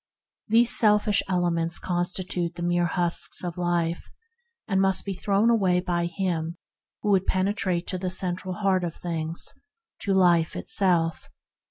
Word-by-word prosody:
These 230 +2 +4
selfish 210 -1 +3
elements 175 -2 0
constitute 175 -1 -2
the 175 - -6
mere 175 0 +1
husks 175 +1 +1
of 175 -2 -4
life, 175 -1 -2 0.6
and 195 -2 +1
must 190 -1 +2
be 200 - -3
thrown 200 +4 +1
away 190 -6 +2
by 175 -1 -1
him 170 -2 -3 0.5
who 210 - +1
would 190 -1 +2
penetrate 185 -2 0
to 185 - -3
the 185 0 -2
Central 185 0 -2
Heart 195 -3 +1
of 170 -2 -4
things 165 -1 -4 0.2
— 455 0 -64
to 195 -2 0
Life 175 -3 +3
itself. 170 -4 +1
180 Hz, 150 wpm, -25 LUFS, 175-195 Hz, 0.6 s, These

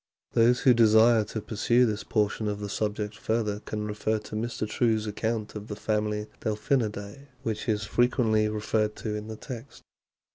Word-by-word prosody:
Those 120 +2 +4
who 130 -3 +6
desire 110 0 +6
to 110 +1 -5
pursue 120 +4 +2
this 110 -2 -2
portion 105 0 0
of 105 0 -2
the 105 -1 -5
subject 105 0 -2
further 110 -2 -1
can 105 0 -4
refer 105 +1 -1
to 105 0 -8
Mr. 110 0 -2
True's 110 -1 +1
account 110 +1 -2
of 105 0 -7
the 105 - -5
family 105 0 -1
Delphinidae, 110 +2 -2 0.2
which 110 0 -3
is 105 -1 +1
frequently 110 -2 +2
referred 105 0 0
to 110 - -4
in 105 0 -5
the 110 - -6
text. 120 -1 -9
110 Hz, 170 wpm, -27 LUFS, 105-115 Hz, 0.2 s, who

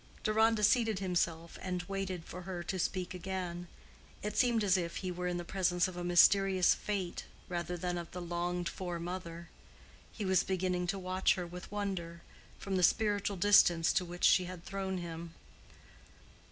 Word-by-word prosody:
Deronda 220 0 +3
seated 225 -1 +3
himself 170 -3 -1
and 180 -1 -3
waited 190 -2 -4
for 180 - -8
her 175 -1 -5
to 185 +2 -3
speak 185 0 -2
again. 180 -1 -4 0.6
It 210 0 -3
seemed 235 -3 +3
as 195 -2 +4
if 170 -2 -2
he 185 -1 -3
were 180 0 -3
in 175 0 -1
the 175 - -5
presence 180 -1 +1
of 185 - -8
a 175 - -4
mysterious 185 +1 +5
Fate 195 -4 -3 0.2
rather 175 0 -3
than 175 0 -2
of 170 - -7
the 180 - -7
longed 175 0 -2
for 175 -1 -4
mother. 170 -1 -6 0.6
He 210 - -5
was 190 -1 +4
beginning 180 -1 -1
to 195 - -1
watch 185 0 +1
her 180 - -4
with 180 +2 -9
wonder, 185 -5 -4 0.3
from 195 -1 -2
the - - +1
spiritual 205 +1 +2
distance 175 -3 +5
to 185 - +2
which 175 0 -8
she 185 - +5
had 180 -1 -8
thrown 190 -1 -3
him. 170 -1 -7
180 Hz, 175 wpm, -33 LUFS, 175-195 Hz, 0.6 s, mysterious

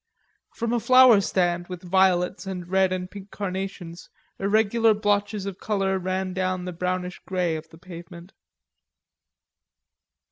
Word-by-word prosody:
From 235 0 -2
a 240 - +2
flower 250 -2 +6
stand 175 -2 0
with 180 0 -8
violets 185 +1 +1
and 180 -2 -5
red 190 0 +2
and 185 -1 -3
pink 200 -1 -10
carnations 190 -3 -6 0.3
irregular 220 +2 +3
blotches 205 -1 0
of 195 -2 -6
color 195 -2 -1
ran 185 0 -2
down 185 0 -1
into 180 0 -5
the 170 - -13
brownish 180 0 -3
grey 180 -3 0
of 160 0 -8
the 160 - -15
pavement. 175 0 -11
185 Hz, 140 wpm, -24 LUFS, 180-200 Hz, 0.3 s, flower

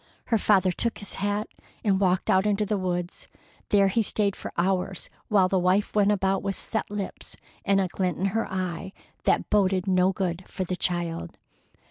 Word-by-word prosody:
Her 225 -3 +3
father 190 -3 +3
took 230 +5 -1
his 205 - -5
hat 205 +1 0 0.4
and 195 -3 +2
walked 185 -1 +1
out 190 +2 +3
into 210 0 +1
the 210 +1 0
woods. 180 -1 -3 0.4
There 200 -1 +5
he 210 +4 +2
stayed 205 -2 +1
for - - -7
hours, 185 +1 -1 0.2
while 195 -3 +4
the 190 0 +1
wife 185 +3 +2
went 205 -1 +4
about 195 -1 +1
with 195 -1 -2
set 220 - -3
lips 205 -1 -6 0.3
and 195 -1 +3
a 190 - +1
glint 180 -1 -2
in 190 - -1
her 225 0 -1
eye 185 0 -3 0.3
that - - +1
boded 190 -3 +2
no 185 -1 +3
good 185 -1 -2
for 185 - -4
the 185 0 -3
child. 175 -2 -2
190 Hz, 185 wpm, -26 LUFS, 185-205 Hz, 0.4 s, There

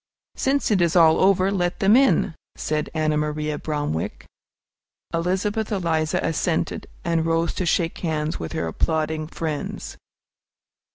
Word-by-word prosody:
"Since 275 -2 +1
it 195 -4 +3
is 170 0 +2
all 160 -2 +6
over, 190 0 +4
let 175 -3 0
them 200 +3 +5
in," 260 -8 +4 0.2
said 150 0 -2
Ann 155 -1 +1
Maria 150 0 -2
Bromwick. 145 - -3 0.9
Elizabeth 190 +6 -1
Eliza 165 -5 0
assented, 165 +1 -1 0.2
and 165 -1 +1
rose 165 0 +1
to 185 - -2
shake 165 0 0
hands 155 -2 -2
with 80 - -5
her - - -1
applauding 155 - -1
friends. 155 -2 -5
165 Hz, 130 wpm, -23 LUFS, 155-185 Hz, 0.9 s, all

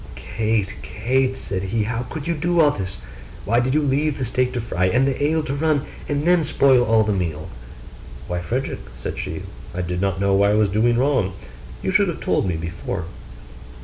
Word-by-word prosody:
'Kate, 110 -4 -1
Kate,' 130 - 0
said 95 -1 -3
he, 105 +3 -1
'how 115 +2 -2
could 155 -3 -5
you 170 - 0
do 170 +2 0
all 150 -3 +6
this?' 95 -6 -5 0.5
Why 115 +3 +3
did 130 +3 +1
you 155 - +3
leave 145 +1 +1
the 130 - -2
steak 125 +2 +1
to 125 - -1
fry, 110 -5 -1
and 125 +7 +3
the 135 +1 -1
ale 155 +2 +2
to 140 - -3
run, 145 -1 +1 0.3
and 145 +1 0
then 175 -1 +4
spoil 135 -4 +4
all 110 -1 +4
the 105 -1 0
meal?' 80 -4 -3 0.8
'Why, 90 0 -2
Frederick,' 125 +10 -2 0.2
said - - -5
she, - - -4 0.3
'I 90 - -1
did 90 +1 -2
not 95 -1 0
know 100 0 +3
I 100 +1 +4
was 105 -1 +3
doing 115 +4 +2
wrong; 125 -8 +2 0.5
you - - 0
should 200 +1 +4
have 170 - -3
told - - 0
me 90 - 0
before. 85 +2 -4
120 Hz, 205 wpm, -22 LUFS, 95-140 Hz, 0.8 s, all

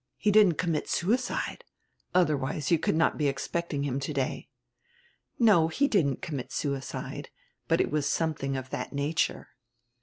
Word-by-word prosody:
He 210 - +2
didn't 205 -5 +6
commit 165 -4 -1
suicide, 235 +9 -1 0.5
otherwise 150 -4 +1
you 165 - +5
could 155 - +1
not 160 - +2
be 150 - +2
expecting 145 +1 -2
him 135 -1 -1
today." 140 -1 -3 0.9
"No, 205 -9 +5
he 280 - +1
didn't 150 - +1
commit 140 -6 -5
suicide, 140 -3 -4 0.4
but - - +2
it - - +1
was 150 -1 0
something 140 -5 -1
of 130 +1 -7
that - - -4
nature." 145 +4 -1
155 Hz, 145 wpm, -28 LUFS, 140-170 Hz, 0.9 s, didn't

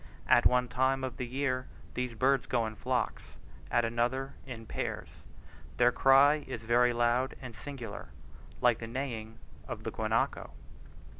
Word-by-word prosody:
At - - +6
one 125 0 +2
time 130 +1 +1
of 130 0 -4
the 125 -3 -3
year 130 0 -1 0.3
these 125 -2 -3
birds 135 +4 +2
go 120 -2 +1
in 110 - -4
flocks, - - -3 0.3
at 120 -1 +2
another 120 +4 -1
in 115 -3 -7
pairs, - - -4 0.7
their 120 0 +5
cry 135 +4 +5
is 120 -4 -6
very 120 +2 +4
loud 120 +2 +1
and 125 -4 -9
singular, 120 -4 -7 0.5
like 120 -2 +4
the 115 - -6
neighing 115 -3 -5 0.3
of - - -6
the - - -3
guanaco. - - -1
125 Hz, 150 wpm, -31 LUFS, 120-130 Hz, 0.7 s, At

